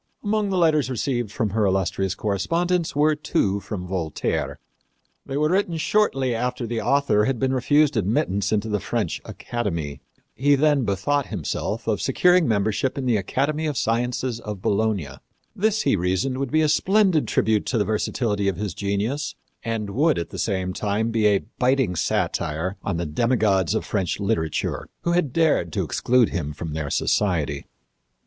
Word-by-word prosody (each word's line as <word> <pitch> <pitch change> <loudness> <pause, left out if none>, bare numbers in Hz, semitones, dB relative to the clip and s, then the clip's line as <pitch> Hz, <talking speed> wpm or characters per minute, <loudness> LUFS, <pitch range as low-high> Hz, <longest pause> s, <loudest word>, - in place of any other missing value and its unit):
Among 210 -1 0
the 190 - 0
letters 155 -6 +3
received 120 -3 -2
from 110 -3 -1
her 110 +1 +1
illustrious 95 0 0
correspondents 165 - 0
were 150 +2 +4
two 145 - 0
from 100 -3 -6
Voltaire. 90 -4 -2 0.7
They 135 - -3
were 150 +1 +2
written 185 -3 +1
shortly 145 - +1
after 125 +1 -2
the 115 0 -2
author 135 -7 +2
had 135 0 0
been 130 +2 0
refused 145 +3 +3
admittance 100 -1 0
into 110 0 0
the 105 -1 0
French - - -2
academy. 85 -12 -4 0.3
He 145 +3 +3
then 145 -2 +2
bethought 125 +9 0
himself 105 +4 -3
of 105 -6 0
securing 180 - +3
membership 110 +5 0
in 135 - -2
the 120 -3 +2
Academy 140 +10 -1
of 145 -3 -2
Sciences 120 +1 -1
of 105 -4 -6
Bologna. 100 -5 0 0.5
This, 220 +2 +1
he - - +3
reasoned, 95 +9 0
would 135 -2 -2
be 155 +3 +2
a - - +3
splendid 185 - +3
tribute 105 0 +1
to 125 - 0
the 105 - +2
versatility 105 0 -1
of 95 - 0
his 105 -4 -3
genius 110 - -2 0.3
and 110 -3 -3
would, 150 +7 +2
at 85 - -4
the - - -6
same 95 -3 -1
time, 105 +4 -1
be 110 -2 +3
a 100 -2 +2 0.2
biting 125 -7 +2
satire 80 +3 -1
on 95 -4 -2
the 85 - -2
demigods 100 0 +1
of - - -1
French 95 -3 -1
literature 100 -6 -1
who 170 - +1
had 170 -6 +1
dared 155 - +2
to - - 0
exclude 125 -2 +2
him 75 -4 -3
from 80 +1 -6
their 75 -2 -3
society. 80 -6 0
115 Hz, 170 wpm, -23 LUFS, 100-140 Hz, 0.7 s, were